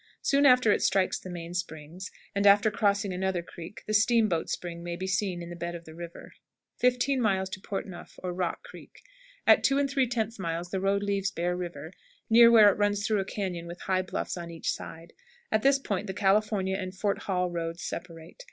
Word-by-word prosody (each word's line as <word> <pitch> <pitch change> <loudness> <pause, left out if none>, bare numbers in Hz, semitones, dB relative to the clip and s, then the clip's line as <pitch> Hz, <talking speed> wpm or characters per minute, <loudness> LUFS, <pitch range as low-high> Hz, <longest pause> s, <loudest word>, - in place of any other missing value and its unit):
Soon 280 0 +4
after 250 -4 +5
it - - +2
strikes 190 -1 +2
the 185 - -10
main 170 -1 -7
springs, 170 +1 -6 0.2
and 200 0 +2
after 205 +2 +6
crossing 200 -2 +1
another 185 -1 -1
creek 170 +3 -10
the 215 - -3
"Steam 225 +1 +4
boat 170 -5 -1
Spring" 170 -1 -5
may 175 0 -4
be 185 +2 -5
seen 190 -2 -1
in 170 - -8
the - - -6
bed 170 0 -5
of 170 0 -9
the 160 - -11
river. 170 +1 -10 0.4
15. 250 +1 +2 0.4
"Port 195 - -4
Neuf," 180 -3 -11
or 180 -1 -3
Rock 180 - -3
Creek. - - -14 0.4
At - - +6
2 275 - +3
3/10 245 -6 0
miles 170 0 -3
the 190 - -2
road 200 +1 +1
leaves 200 -1 0
Bear 175 -1 -2
River 170 -2 -6 0.4
near 230 +1 +8
where 215 -3 +8
it 200 - -6
runs 205 0 +1
through 215 -1 +1
a 195 - -1
cañon 180 -4 -4
with 175 +1 -9
high 185 -1 +1
bluffs 185 0 -4
on 170 -1 -6
each 165 -1 -2
side. 165 +1 -8 0.4
At 215 - +2
this 275 +2 +4
point 210 -6 -3
the 190 - -5
California 195 -1 +1
and 185 -1 -5
Fort 200 +1 -1
Hall 180 -2 -1
roads 165 0 -4
separate. 165 -2 -7
190 Hz, 205 wpm, -28 LUFS, 175-210 Hz, 0.4 s, near